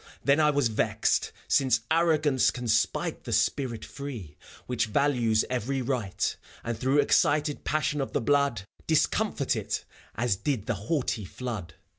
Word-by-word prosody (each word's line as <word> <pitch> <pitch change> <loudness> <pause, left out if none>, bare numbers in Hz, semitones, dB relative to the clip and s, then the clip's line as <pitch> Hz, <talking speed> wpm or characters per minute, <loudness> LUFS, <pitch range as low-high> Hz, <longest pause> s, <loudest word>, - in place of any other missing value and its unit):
Then 140 +2 +4
I 150 -1 +5
was 145 -4 +2
vexed, 110 - 0 0.2
since 130 -3 +3
arrogance 155 -5 +3
can 125 -1 -5
spite 110 0 0
The - - -6
spirit 120 -6 0
free, 125 - -7 0.3
which 125 -2 -1
values 120 -3 +2
every 130 +2 -2
right, 120 -6 -1 0.3
And 115 0 -2
through 130 +5 +1
excited 145 +1 +2
passion 150 -1 0
of 135 - -3
the - - 0
blood 140 -4 +2 0.2
Discomfort - - +1
it, - - -3 0.3
as 120 -4 0
did 115 -1 -2
the 120 - 0
haughty 110 - -2
flood. 95 -5 -6
125 Hz, 145 wpm, -27 LUFS, 110-145 Hz, 0.3 s, I